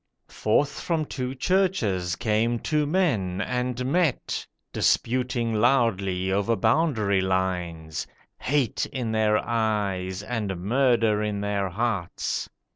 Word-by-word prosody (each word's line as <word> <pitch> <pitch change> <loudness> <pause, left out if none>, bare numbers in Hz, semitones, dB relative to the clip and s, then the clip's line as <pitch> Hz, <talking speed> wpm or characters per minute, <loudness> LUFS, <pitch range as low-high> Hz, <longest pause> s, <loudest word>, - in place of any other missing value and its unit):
Forth 140 +7 +1
from 165 -3 -1
two 130 -2 -4
churches 125 - +1
came 115 +2 +1
two 150 +4 0
men, 125 - +1
and 125 +3 -2
met, 155 +1 0 0.3
Disputing 120 -1 +1
loudly 105 -6 +2
over 100 +4 +1
boundary 110 - +2
lines, 90 -4 -2 0.3
Hate 135 -5 0
in 125 -5 -3
their 110 -1 +3
eyes, 100 -5 -1
and 105 -5 -3
murder 115 0 +2
in 105 -1 -2
their 100 -1 -1
hearts. 105 -2 -2
110 Hz, 110 wpm, -25 LUFS, 95-125 Hz, 0.3 s, their